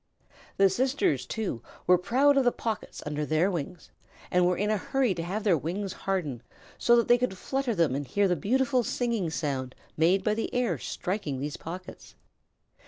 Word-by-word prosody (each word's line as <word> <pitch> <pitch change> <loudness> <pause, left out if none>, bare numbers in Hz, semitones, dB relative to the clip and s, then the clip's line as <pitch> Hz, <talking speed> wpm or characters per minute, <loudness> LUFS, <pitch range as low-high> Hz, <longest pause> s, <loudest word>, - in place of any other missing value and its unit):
The 195 - +6
sisters, 190 - 0
too, 210 - -3 0.2
were 180 0 +5
proud 270 +9 +3
of 275 - +4
the 245 - +4
pockets 225 -4 -5
under 150 0 -2
their 155 +6 +2
wings, 175 0 -5 0.4
and 180 0 +4
were 180 - +1
in 210 +2 0
a 215 - +2
hurry 255 +2 +1
to 170 - -4
have 195 +6 -3
their 200 -5 +4
wings 185 +6 -3
harden, 160 -11 -2 0.4
so 240 - +5
that 235 - +3
they 240 0 +5
could 240 -6 -1
flutter 265 +1 -1
them 165 -7 +2
and 140 0 -3
hear 200 +10 +2
the 180 - +2
beautiful 255 - +1
singing 230 -6 -1
sound 135 -5 -3 0.2
made 180 +5 +3
by 210 - +2
the 225 - -2
air 230 - +1
striking 175 - -3
these 145 +2 -4
pockets. 180 +3 -9
190 Hz, 185 wpm, -28 LUFS, 160-235 Hz, 0.4 s, The